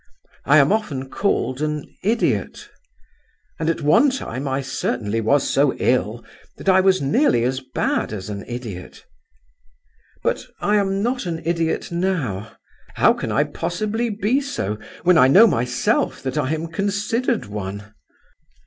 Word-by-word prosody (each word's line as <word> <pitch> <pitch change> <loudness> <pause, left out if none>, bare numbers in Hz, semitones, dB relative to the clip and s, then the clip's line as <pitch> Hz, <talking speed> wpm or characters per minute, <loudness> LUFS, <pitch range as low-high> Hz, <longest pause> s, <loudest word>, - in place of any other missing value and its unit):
I 145 +3 +5
am 140 +2 +5
often 145 -12 -2
called 130 -9 -1
an 150 -1 -2 0.2
idiot, 225 +4 -1 0.9
and 160 0 0
at 165 - -1
one 225 - +5
time 140 - -4
I 135 +1 -1
certainly 115 -4 -2
was 140 +6 +2
so 140 -1 +2
ill 120 -2 0 0.3
that - - -11
I 190 0 +6
was 185 -4 +3
nearly 140 - +3
as 130 +2 0
bad 130 -4 -2
as 95 -3 -6
an 100 -1 -5
idiot; 115 -7 -8 1.2
but - - 0 0.2
I 210 +1 +2
am 195 0 0
not 245 -3 -1
an 165 -1 -4
idiot 165 0 -1
now. 145 - -2 0.4
How - - +5
can - - -4
I - - +3
possibly 215 +6 -2
be 215 +6 0
so 105 - -3 0.2
when 180 0 +5
I 130 - +7
know 190 +12 +8
myself 125 - 0
that 130 -1 -3
I 130 - 0
am 160 +1 -5
considered 205 +6 -1
one? 100 0 -6
150 Hz, 150 wpm, -21 LUFS, 125-200 Hz, 1.2 s, know